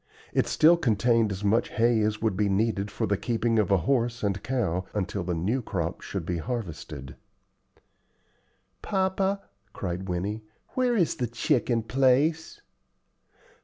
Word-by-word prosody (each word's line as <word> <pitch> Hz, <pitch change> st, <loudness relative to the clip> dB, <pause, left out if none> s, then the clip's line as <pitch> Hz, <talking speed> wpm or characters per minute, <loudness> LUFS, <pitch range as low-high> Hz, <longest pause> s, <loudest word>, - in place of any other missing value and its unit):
It -, -, +2 dB
still 170 Hz, +3 st, +5 dB
contained 115 Hz, -5 st, +2 dB
as 95 Hz, +1 st, -5 dB
much 110 Hz, +4 st, +2 dB
hay 115 Hz, -1 st, +2 dB
as 105 Hz, +1 st, -1 dB
would 110 Hz, -4 st, +1 dB
be 105 Hz, +1 st, +1 dB
needed 100 Hz, 0 st, 0 dB
for -, -, -2 dB
the 100 Hz, -, 0 dB
keeping 115 Hz, +1 st, 0 dB
of 105 Hz, -, +1 dB
a 100 Hz, -, +5 dB
horse 120 Hz, -3 st, +1 dB
and 100 Hz, -1 st, 0 dB
cow 105 Hz, -8 st, -1 dB
until 100 Hz, -1 st, -2 dB
the 90 Hz, 0 st, -2 dB
new 105 Hz, +11 st, 0 dB
crop 85 Hz, -6 st, -3 dB
should 95 Hz, -5 st, -5 dB
be 85 Hz, 0 st, -2 dB
harvested. 80 Hz, -, -5 dB, 1.7 s
"Papa," 195 Hz, 0 st, 0 dB, 0.3 s
cried 95 Hz, 0 st, -4 dB
Winnie, 100 Hz, +5 st, -2 dB, 0.3 s
"where 250 Hz, -2 st, +1 dB
is 175 Hz, -5 st, +1 dB
the 125 Hz, -4 st, -1 dB
chicken 120 Hz, -1 st, 0 dB
place?" 135 Hz, +7 st, +2 dB
110 Hz, 145 wpm, -27 LUFS, 95-125 Hz, 1.7 s, still